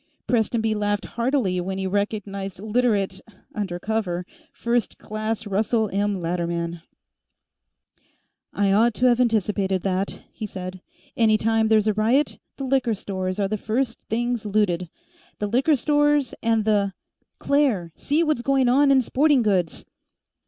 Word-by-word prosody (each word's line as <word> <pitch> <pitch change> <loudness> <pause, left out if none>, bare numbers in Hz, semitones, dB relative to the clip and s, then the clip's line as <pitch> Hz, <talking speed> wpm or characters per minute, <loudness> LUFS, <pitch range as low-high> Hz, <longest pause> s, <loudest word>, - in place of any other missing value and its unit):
Prestonby 225 -1 +1
laughed 205 -1 -1
heartily 235 -7 0
when 190 +2 -4
he 190 - -2
recognized 200 -1 -3
Literate 210 -3 0 0.3
undercover 190 -1 -2 0.3
First 235 -1 -1
Class 215 +1 -4
Russell 215 +2 0
M. 200 0 0
Latterman. 170 -1 -2 1.7
"I 200 -1 +1
ought 220 +3 +3
to 250 - +1
have 245 -1 +4
anticipated 205 -5 +1
that," 195 0 -2
he 215 - -5
said. 185 -1 -7 0.3
"Any 220 -2 +4
time 225 +1 +2
there's 215 -1 +4
a 215 - +2
riot, 230 +8 +1 0.2
the 275 - -5
liquor 260 -4 +1
stores 185 -1 -4
are 200 - +1
the 215 +2 -2
first 230 +3 -1
things 240 0 -1
looted. 195 -5 0 0.5
The 210 - -2
liquor 260 +9 +2
stores, 295 0 +2
and 225 -2 +1
the 200 -3 +2 0.4
Claire! 255 - +1
See 300 - 0
what's 305 -6 0
going 270 0 +2
on 275 +3 +4
in 265 -2 +5
Sporting 275 +1 +3
Goods!" 185 -6 0
215 Hz, 140 wpm, -23 LUFS, 195-240 Hz, 1.7 s, in